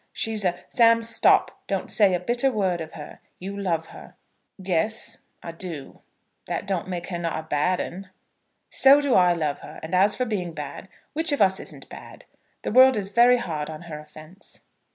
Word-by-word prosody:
She's 220 -2 -1
a 180 -1 0
" - - -30
"Sam, 230 -1 +5
stop. 230 0 +3
Don't - - -3
say 200 -4 +4
a - - -1
bitter 240 +8 0
word 190 -6 -1
of 160 - -8
her. 150 -2 -10 0.2
You 195 +2 -7
love 170 -5 -2
her." - - -13 0.4
"Yes; 195 +4 -1 0.2
I 170 - -6
do. 165 -4 -8 0.5
That - - -3
don't 190 -3 -2
make 175 -1 -5
her 175 -2 -4
not 170 -2 -2
a 160 - -5
bad 160 +4 0
'un." 190 +2 -6 0.6
"So 275 +2 +6
do 285 -3 0
I 180 -1 +5
love 155 -4 -2
her. - - -11
And 160 +3 -7
as 195 +3 +4
for 255 - -1
being 185 -7 -3
bad, 150 +5 -8 0.2
which 320 +1 +1
of 285 - 0
us 190 -2 +3
isn't - - -9
bad? - - -12 0.4
The - - -3
world 260 +1 +6
is 195 -2 -3
very 240 +4 +5
hard 155 -9 -4
on 155 +2 -8
her 155 -3 -8
offence." 155 +5 -14
185 Hz, 195 wpm, -24 LUFS, 165-220 Hz, 0.6 s, So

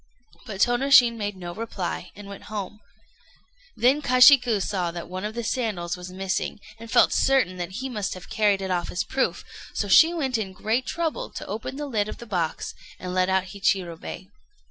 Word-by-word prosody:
But 195 -2 -5
Tônoshin 245 -1 +5
made 205 -3 -4
no 175 -1 -7
reply, 185 -4 -5
and 205 0 -11
went 200 0 -10
home. 210 -1 -6 1.0
Then 265 +5 +3
Kashiku 250 -3 +6
saw 185 -2 -1
that 170 0 -7
one 185 +2 -6
of 215 +1 -4
the 235 - -3
sandals 210 -9 -2
was 180 0 -9
missing, 190 +2 -3 0.2
and 230 0 -10
felt - - +4
certain 265 -9 +2
that 175 -1 -4
he 260 +6 -4
must 210 -7 -3
have 185 - -11
carried 205 -2 +1
it 190 - -3
off 175 -1 -1
as 180 - -1
proof; 265 +7 -1 0.3
so 205 - -1
she 320 - +7
went 270 -8 -1
in 195 -3 -4
great 225 +6 -1
trouble 330 -3 -2
to - - -6
open 220 +6 -5
the 295 +1 -4
lid 215 -6 -1
of - - -7
the 235 - -10
box, 175 -7 -2 0.2
and 180 0 -6
let 185 0 +2
out 190 0 +1
Hichirobei. 190 -3 -2
205 Hz, 190 wpm, -25 LUFS, 185-245 Hz, 1.0 s, she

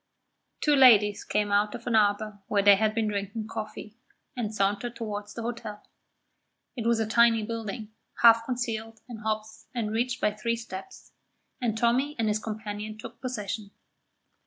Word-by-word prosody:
Two 295 -1 +4
ladies 215 -6 +6
came 210 -1 0
out 205 +1 +2
of - - -9
an 240 - +1
arbour 210 0 +2
where 200 -1 +2
they 205 0 +8
had 215 +1 +1
been 225 -1 +1
drinking 205 +2 -3
coffee, 220 -1 -7 0.4
and 230 -4 -2
sauntered 205 +3 -1
towards 210 -3 -5
the 230 - -5
hotel. 225 -3 -6 0.9
It 230 -3 -2
was 235 -1 +3
a 220 - +1
tiny 230 0 +4
building, 220 -1 -5 0.3
half 230 -1 +8
concealed 225 -3 -3
in 240 -3 -7
hops 215 0 -4
and 220 -3 -1
reached 240 +3 -1
by 210 - +2
three 230 +3 -1
steps, 230 - -9 0.5
and 225 -3 0
Tommy 255 +6 +2
and 225 -2 0
his 210 0 +1
companion 215 -1 -5
took 225 +1 -10
possession. 215 -4 -4
220 Hz, 160 wpm, -27 LUFS, 210-235 Hz, 0.9 s, they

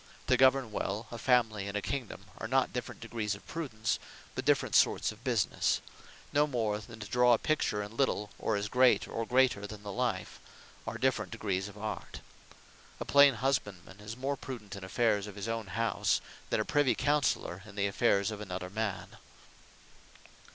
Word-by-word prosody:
To - - +4
govern 130 -3 +4
well 105 +2 -2
a 120 - -6
family, 115 -6 +2
and 100 +1 -2
a - - -1
kingdome, 110 -2 -4
are - - -4
not 130 +2 +2
different 125 - -5
degrees 115 -3 -2
of 100 - -14
Prudence; 115 -9 -2 0.3
but - - -4
different - - +2
sorts - - +4
of - - -15
businesse; - - +1 0.5
no 150 +1 +4
more 110 -6 -1
then 110 +1 -11
to 105 - -6
draw 125 +3 +5
a - - +5
picture 110 -9 0
in 105 +2 -9
little, 105 -6 0
or 110 - 0
as 100 0 -1
great, 125 +3 +4
or 115 0 -3
greater 125 -5 +3
then 105 -1 -9
the 100 - -5
life, 115 -4 -2 0.5
are 115 +1 -3
different 115 -5 0
degrees 100 -4 -2
of 100 0 -11
Art. 110 +1 -5 0.8
A - - -4
plain 140 -2 +7
husband 110 -8 -1
man 95 +1 -14
is 110 +3 -7
more 135 +2 -1
Prudent 120 -7 -7
in 100 - -8
affaires 105 +1 +1
of 105 - -9
his 100 +1 -5
own 115 -2 -3
house, 115 +4 +1 0.3
then - - +1
a 110 - 0
Privy 145 -3 +3
Counseller 145 -9 +1
in 105 - -12
the 100 -1 +1
affaires 100 +1 +2
of 105 -1 -6
another 90 -2 -5
man. 110 -2 -3
110 Hz, 185 wpm, -31 LUFS, 100-125 Hz, 0.8 s, plain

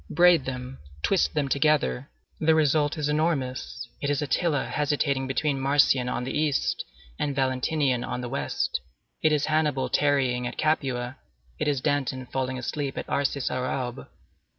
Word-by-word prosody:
Braid 175 -3 +5
them, 130 0 -5 0.2
twist 190 -4 +2
them 145 -2 +1
together; 140 - +1 0.3
the 160 0 +4
result 150 0 +2
is 150 -1 -1
enormous: 135 -6 -1
it 140 - -1
is 145 -2 +1
Attila 145 0 +1
hesitating 140 -2 0
between 135 +1 0
Marcian 135 -2 +3
on 125 - -2
the 130 - -4
east 150 -2 +1 0.4
and 145 -2 -1
Valentinian 130 0 +1
on 125 0 -3
the 125 - -4
west; - - -1 0.4
it 155 - +4
is 150 -1 +2
Hannibal 150 -4 +1
tarrying 130 -4 +2
at - - -7
Capua; 130 -5 0 0.4
it - - 0
is 140 -3 +1
Danton 130 -2 -1
falling 130 0 -2
asleep 135 +2 -3
at - - -3
Arcis 140 -1 0
sur 125 0 -1
Aube. 125 -2 -3
140 Hz, 155 wpm, -26 LUFS, 130-150 Hz, 0.4 s, Braid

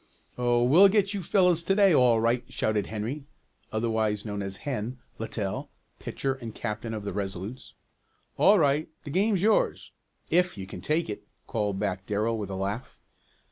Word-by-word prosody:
"Oh, 120 -1 +2
we'll 165 +11 +7
get 200 0 +2
you 200 - -2
fellows 180 -1 +3
to 195 +3 +1
day 200 -3 +5
all 125 -5 +5
right!" 115 +2 +1
shouted 105 -3 0
Henry 115 +7 -4 0.5
(otherwise 110 -1 0
known 105 -1 -3
as 95 0 -5
Hen) 125 -3 -3 0.2
Littell, 110 -3 -3 0.3
pitcher 135 -1 -2
and 115 -4 -8
captain 115 0 -4
of 105 - -5
the 100 - -4
Resolutes. 100 +4 -5 0.6
"All 205 +2 +6
right, 150 -1 +2
the 145 - -7
game's 195 +2 +2
yours 220 0 +2 0.4
if 180 -6 +2
you 95 - -5
can 95 - -9
take 160 +3 0
it," 105 - -7 0.2
called 105 -3 -1
back 95 -2 -3
Darrell, 110 +2 0
with 100 -2 -4
a 95 - -4
laugh. 100 +6 -4
115 Hz, 170 wpm, -27 LUFS, 105-155 Hz, 0.6 s, we'll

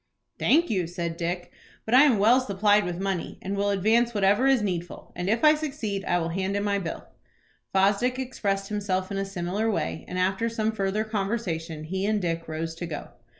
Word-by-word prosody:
"Thank 335 0 +3
you," 185 -5 0
said 170 -1 -4
Dick; 175 +1 -3 0.3
"but 220 - -2
I 265 +4 +8
am 255 -7 +4
well 230 +6 +5
supplied 205 -2 +2
with 175 0 -4
money, 195 -3 -3
and 195 +1 -4
will 200 0 0
advance 220 +4 +2
whatever 205 +6 +3
is 265 -5 +4
needful, 175 -3 -4
and 180 +2 -2
if 225 +5 +1
I 305 0 +8
succeed 270 -10 -3
I 175 - +2
will 165 -1 -1
hand 190 +3 -1
in 200 - -1
my 200 -1 +1
bill." 165 -4 -5 0.7
Fosdick 200 +6 +2
expressed 200 -7 -2
himself 195 -2 -2
in 195 - -2
a 195 - -1
similar 195 +3 -2
way, 80 - -2
and 180 - -5
after 190 +5 +1
some 220 -1 -1
further 205 0 -1
conversation 195 -7 -3
he 190 +5 -2
and 215 0 +1
Dick 165 -3 -2
rose 160 +1 -4
to 175 - -4
go. 155 -3 -6
195 Hz, 200 wpm, -26 LUFS, 175-220 Hz, 0.7 s, I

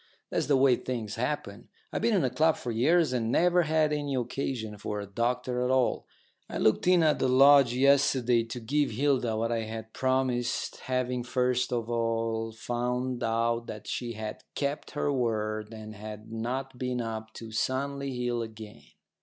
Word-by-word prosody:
That's - - 0
the 140 -2 +4
way 130 -2 +5
things 115 -5 -4
happen. 120 -4 -4 0.2
I've - - -1
been 230 -1 +3
in 185 - +2
a 130 - +1
club 155 +5 +3
for 120 - -4
years, 150 +6 +3
and 115 -2 0
never 180 +4 +4
had 155 -1 +2
any 145 -2 -2
occasion 120 -4 -3
for 105 0 -3
a 100 - -5
doctor 125 +4 -1
at 125 - 0
all. 130 -1 +1 0.4
I - - -4
looked 110 +10 +2
in 180 -2 +5
at 155 -1 +3
the - - +2
lodge 135 -1 +6
yesterday 130 -3 +4
to 115 +2 -6
give 140 +5 0
Hilda 125 -2 +1
what 115 +1 -1
I 115 - +1
had 110 0 -6
promised, 130 -2 0
having 125 -1 -2
first 125 0 0
of 120 -2 -1
all 115 -1 -1
found 125 +2 -2
out 115 +1 0
that 105 - -7
she 120 -1 -3
had 110 -1 -6
kept 140 +1 -2
her 145 - +1
word 110 -4 -1
and 110 -1 -8
had 105 +1 -9
not 125 +3 -4
been 125 -1 -2
up 110 -1 -4
to 115 -1 -9
Sunley 140 +4 -1
Hill 120 -1 0
again. 110 -2 -9
125 Hz, 180 wpm, -28 LUFS, 115-135 Hz, 0.4 s, lodge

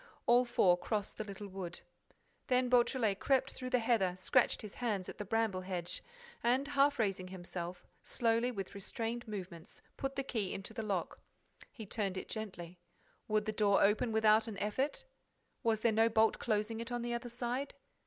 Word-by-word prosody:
All 245 +1 +5
four 180 -7 +4
crossed 205 +2 -3
the - - 0
little 205 0 -7
wood. 185 -3 -6 0.7
Then 250 -1 +3
Beautrelet 240 -4 +3
crept 270 -2 +2
through 255 -1 -5
the 255 - +3
heather, 225 -6 +2
scratched 235 +6 +2
his 210 - -7
hands 210 -7 -2
at - - -9
the 205 - -3
bramble 220 -2 0
hedge 180 -1 -4 0.4
and, 260 +4 +2
half 285 0 +3
raising 195 -4 0
himself, 180 -1 -6 0.2
slowly, 230 0 +1
with 195 -6 -5
restrained 225 +4 -4
movements, 185 -6 -8
put 270 0 -3
the 275 - -1
key 220 -8 -2
into 195 - -5
the 225 - -3
lock. 200 -5 -2 0.5
He 220 - -8
turned 195 -2 -2
it - - -5
gently. 180 -5 -6 0.5
Would 215 -1 +1
the 215 - 0
door 205 -2 +3
open 210 +4 +3
without 220 0 +4
an 215 -3 -5
effort? 260 - -1 0.6
Was 220 -2 +1
there 230 - +4
no 225 +1 +4
bolt 220 0 +3
closing 220 0 0
it 230 +2 -5
on 240 -1 -2
the 240 0 -2
other 240 +1 -3
side? 245 +3 -3
220 Hz, 180 wpm, -34 LUFS, 195-240 Hz, 0.7 s, All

